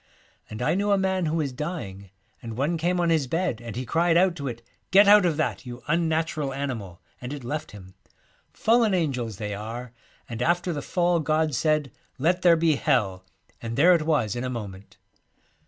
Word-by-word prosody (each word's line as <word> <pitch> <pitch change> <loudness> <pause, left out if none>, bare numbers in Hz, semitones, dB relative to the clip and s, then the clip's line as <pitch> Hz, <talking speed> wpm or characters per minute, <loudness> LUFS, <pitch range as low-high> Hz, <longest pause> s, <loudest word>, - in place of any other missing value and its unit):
And 110 +3 -5
I 150 - +2
knew 200 +3 0
a 200 - +4
man 190 -2 0
who 155 - -1
was 150 -4 -1
dying, 125 - -6 0.3
and 115 -1 -7
one 145 +6 0
came 175 +2 0
on 170 -1 +2
his 155 -5 +1
bed, 165 -5 -1
and 115 -2 -7
he 130 +1 -4
cried 165 +5 +2
out 180 -1 +3
to 140 -2 -4
it, 120 -2 -6 0.3
"Get 195 +3 +6
out 205 -2 +7
of 160 -3 -1
that, 155 - -1
you 125 -1 -9
unnatural 160 -3 0
animal! 115 -10 -5
" - - -38
and 125 +1 -6
it 145 -3 -6
left 150 +5 -4
him. 95 -2 -13 0.6
Fallen 225 -3 +2
angels 125 - -2
they 105 -1 -4
are, 115 +4 -7 0.3
and 115 0 -6
after 175 +4 +1
the 145 - -4
fall 175 +2 +1
God 155 0 0
said, 150 +1 +1
" - - -40
Let 175 +6 +1
there 170 -2 +5
be 160 -3 +2
Hell," 100 -12 0 0.4
and 115 0 -5
there 175 +5 +6
it 170 - +2
was 145 -10 +1
in 120 - -3
a 130 - -2
moment.' 100 -5 -8
150 Hz, 205 wpm, -25 LUFS, 120-170 Hz, 0.6 s, out